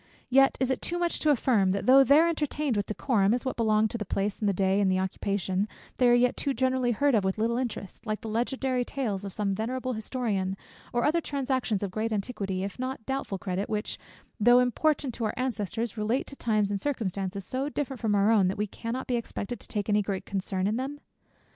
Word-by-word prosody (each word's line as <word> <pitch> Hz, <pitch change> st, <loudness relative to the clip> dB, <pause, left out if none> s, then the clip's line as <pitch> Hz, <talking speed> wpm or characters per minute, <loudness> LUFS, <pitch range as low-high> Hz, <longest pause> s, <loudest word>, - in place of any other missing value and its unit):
Yet 270 Hz, +1 st, +5 dB
is 260 Hz, 0 st, +1 dB
it 260 Hz, -, -1 dB
too 350 Hz, -, -2 dB
much 345 Hz, -1 st, 0 dB
to 310 Hz, -, +2 dB
affirm, 235 Hz, -8 st, +3 dB
that 195 Hz, +1 st, -1 dB
though 270 Hz, +2 st, +8 dB
there 295 Hz, +5 st, +6 dB
entertained 300 Hz, -5 st, -1 dB
with 205 Hz, -1 st, -1 dB
decorum, 215 Hz, -2 st, +2 dB
as 250 Hz, -, -4 dB
what 260 Hz, -, -1 dB
belong 220 Hz, -1 st, +3 dB
to 235 Hz, -, -3 dB
the -, -, -1 dB
day 190 Hz, -, -18 dB
and 205 Hz, +1 st, 0 dB
place, 195 Hz, +1 st, +2 dB
and 190 Hz, -2 st, +2 dB
occupation, 190 Hz, +1 st, -1 dB, 0.3 s
they 250 Hz, -, +4 dB
are 240 Hz, -, +6 dB
yet 245 Hz, +1 st, +3 dB
too 275 Hz, -2 st, -1 dB
generally 260 Hz, 0 st, +1 dB
heard 280 Hz, +5 st, +2 dB
of 215 Hz, -4 st, +3 dB
with 190 Hz, +1 st, 0 dB
little 230 Hz, +2 st, +1 dB
interest; 230 Hz, -3 st, -5 dB
like 215 Hz, 0 st, -2 dB
the -, -, -6 dB
legendary 250 Hz, +3 st, 0 dB
tales 225 Hz, -7 st, -3 dB
of 195 Hz, -, -5 dB
some 200 Hz, 0 st, -1 dB
venerable 255 Hz, +5 st, -2 dB
historian, 215 Hz, -4 st, -2 dB, 0.3 s
or 240 Hz, 0 st, 0 dB
other 335 Hz, +3 st, +2 dB
transactions 260 Hz, -8 st, -1 dB
of 195 Hz, -, -3 dB
great 220 Hz, +3 st, -2 dB
antiquity, 200 Hz, -3 st, -2 dB
if 200 Hz, +5 st, -5 dB
not 255 Hz, -1 st, -3 dB
of -, -, -31 dB
doubtful 265 Hz, -7 st, -2 dB
credit, 185 Hz, +2 st, -3 dB
which, 210 Hz, 0 st, -3 dB, 0.4 s
though 240 Hz, +3 st, +6 dB
important 255 Hz, +2 st, +2 dB
to 230 Hz, -, -3 dB
our 215 Hz, -, -2 dB
ancestors, 230 Hz, -2 st, -2 dB
relate 220 Hz, +5 st, 0 dB
to 275 Hz, -, -9 dB
times 215 Hz, -5 st, +1 dB
and 200 Hz, -1 st, -2 dB
circumstances 200 Hz, -7 st, -2 dB
so 265 Hz, +6 st, -2 dB
different 275 Hz, -3 st, -3 dB
from 215 Hz, -3 st, +1 dB
our 200 Hz, +2 st, +4 dB
own, 205 Hz, -5 st, +4 dB
that 185 Hz, -, -2 dB
we 210 Hz, -, 0 dB
cannot 230 Hz, +5 st, -5 dB
be 245 Hz, -, 0 dB
expected 235 Hz, 0 st, -5 dB
to -, -, -11 dB
take 205 Hz, -2 st, -2 dB
any 210 Hz, -1 st, +3 dB
great 195 Hz, -2 st, -3 dB
concern 190 Hz, -1 st, -2 dB
in 215 Hz, +3 st, +1 dB
them? 275 Hz, +3 st, -4 dB
225 Hz, 225 wpm, -28 LUFS, 200-260 Hz, 0.4 s, though